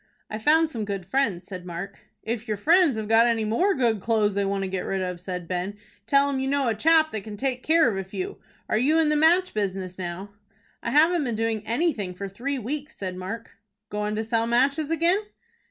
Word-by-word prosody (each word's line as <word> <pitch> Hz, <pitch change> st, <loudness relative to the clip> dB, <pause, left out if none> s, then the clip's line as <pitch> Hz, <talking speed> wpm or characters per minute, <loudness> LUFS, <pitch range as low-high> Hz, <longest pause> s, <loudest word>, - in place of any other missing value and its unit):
"I 215 Hz, -, -3 dB
found 315 Hz, +7 st, +4 dB
some 225 Hz, -5 st, -3 dB
good 200 Hz, -3 st, -4 dB
friends," 195 Hz, -5 st, 0 dB
said 185 Hz, -2 st, -7 dB
Mark. 180 Hz, +3 st, -7 dB, 0.2 s
"If 230 Hz, +1 st, -4 dB
your 215 Hz, -1 st, -1 dB
friends 325 Hz, -, +4 dB
have 215 Hz, -1 st, -3 dB
got 225 Hz, +2 st, +5 dB
any 225 Hz, -2 st, +1 dB
more 360 Hz, -, +2 dB
good 230 Hz, -4 st, +1 dB
clo'es 215 Hz, -2 st, +1 dB
they 200 Hz, +1 st, 0 dB
want 195 Hz, 0 st, -1 dB
to -, -, -2 dB
get 190 Hz, -1 st, -3 dB
rid 195 Hz, -, -2 dB
of," 180 Hz, -1 st, -4 dB
said 180 Hz, -2 st, -5 dB
Ben, 185 Hz, +3 st, -3 dB, 0.3 s
"tell 280 Hz, +3 st, +4 dB
'em 275 Hz, -2 st, -1 dB
you 265 Hz, -, -1 dB
know 275 Hz, -1 st, +1 dB
a -, -, +2 dB
chap 315 Hz, +7 st, +4 dB
that 215 Hz, -, -4 dB
can 210 Hz, +1 st, -8 dB
take 255 Hz, +1 st, -1 dB
care 325 Hz, +1 st, +4 dB
of 225 Hz, -, 0 dB
a 195 Hz, -, -2 dB
few. 370 Hz, -, -6 dB, 0.3 s
Are 215 Hz, -, +1 dB
you 295 Hz, +6 st, +3 dB
in 320 Hz, -2 st, +3 dB
the 300 Hz, -, +2 dB
match 345 Hz, +5 st, +4 dB
business 190 Hz, -3 st, -3 dB
now?" 185 Hz, +3 st, -5 dB, 0.5 s
"I -, -, -3 dB
haven't 320 Hz, +3 st, +4 dB
been 235 Hz, -3 st, -2 dB
doing 225 Hz, -1 st, -1 dB
anything 230 Hz, -, -1 dB
for 200 Hz, +2 st, -5 dB
three 250 Hz, +9 st, -3 dB
weeks," 285 Hz, +5 st, -5 dB
said 185 Hz, -2 st, -5 dB
Mark. 190 Hz, +5 st, -7 dB, 0.3 s
"Goin' 210 Hz, 0 st, -2 dB
to 220 Hz, -, -1 dB
sell 225 Hz, 0 st, 0 dB
matches 275 Hz, +6 st, +2 dB
again?" 335 Hz, +4 st, +3 dB
225 Hz, 225 wpm, -25 LUFS, 195-285 Hz, 0.5 s, got